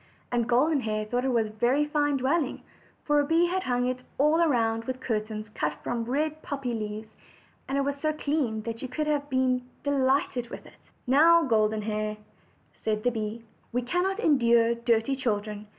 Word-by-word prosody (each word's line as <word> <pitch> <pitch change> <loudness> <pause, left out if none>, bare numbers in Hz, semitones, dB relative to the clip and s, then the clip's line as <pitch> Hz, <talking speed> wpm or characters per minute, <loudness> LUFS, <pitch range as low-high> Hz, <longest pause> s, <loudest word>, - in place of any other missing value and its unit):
And 240 -1 0
Golden 280 +5 +3
Hair 215 -2 -2
thought 245 +4 -1
it 265 - +1
was 230 -2 +2
a - - -6
very 245 +7 +2
fine 290 -1 +1
dwelling, 275 +2 0 0.4
for 295 -1 +3
the 285 - -2
bee 330 +2 +4
had 370 +2 -1
hung 245 -5 0
it 255 0 -2 0.2
all 305 +4 +4
round 225 -4 +1
with 255 +1 -4
cur 225 -4 0
tains 215 0 -8
cut 150 -6 -1
from 235 -1 -2
red 305 +5 -1
poppy 275 -5 -4
leaves; 215 0 -5 0.6
and 275 - 0
it - - +2
was 280 0 -1
so 310 - +1
clean 285 -8 -1
that 230 0 -5
you 260 - -5
would 305 - +1
have 290 -1 -1
been 255 -1 0
delighted 265 -3 +1
with - - -9
it. - - -15 0.3
"Now, 330 +6 +6
Golden 215 -4 +1
Hair," 215 0 -2 0.7
said 215 -1 -1
the 245 - +2
bee, 220 0 -4 0.3
"we 245 +1 -1
cannot 360 - 0
endure 235 - +4
dirty 235 +2 +1
children. 210 -4 -3
250 Hz, 190 wpm, -27 LUFS, 225-285 Hz, 0.7 s, Now